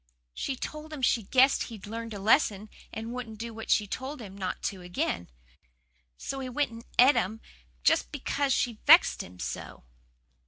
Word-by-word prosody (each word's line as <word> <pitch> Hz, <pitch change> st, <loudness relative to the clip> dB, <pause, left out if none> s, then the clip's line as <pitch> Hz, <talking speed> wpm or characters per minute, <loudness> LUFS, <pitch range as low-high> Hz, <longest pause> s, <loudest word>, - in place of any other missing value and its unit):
"She 270 Hz, -, -3 dB
told 305 Hz, +4 st, -7 dB
him 290 Hz, -4 st, -7 dB
she 240 Hz, -, +3 dB
guessed 260 Hz, +6 st, +4 dB
he'd 220 Hz, -4 st, -9 dB
learned 225 Hz, +1 st, -6 dB
a -, -, -6 dB
lesson 210 Hz, -1 st, +2 dB, 0.2 s
and 225 Hz, +2 st, -5 dB
wouldn't 240 Hz, -3 st, -6 dB
do 230 Hz, +1 st, -6 dB
what 225 Hz, 0 st, -8 dB
she'd 205 Hz, -2 st, +2 dB
told 265 Hz, +3 st, -4 dB
him 200 Hz, -4 st, -9 dB
not 190 Hz, -2 st, -4 dB
to 190 Hz, -2 st, -3 dB
again. 175 Hz, -, -2 dB, 0.9 s
So 270 Hz, -, -5 dB
he 260 Hz, -1 st, -4 dB
went 280 Hz, 0 st, 0 dB
and 230 Hz, 0 st, -10 dB
et 255 Hz, +3 st, +8 dB
them 220 Hz, -4 st, -1 dB, 0.7 s
because 280 Hz, -1 st, -1 dB
she 235 Hz, -3 st, 0 dB
vexed 330 Hz, +4 st, +7 dB
him 90 Hz, +1 st, -11 dB
so." -, -, -6 dB
230 Hz, 170 wpm, -29 LUFS, 205-265 Hz, 0.9 s, et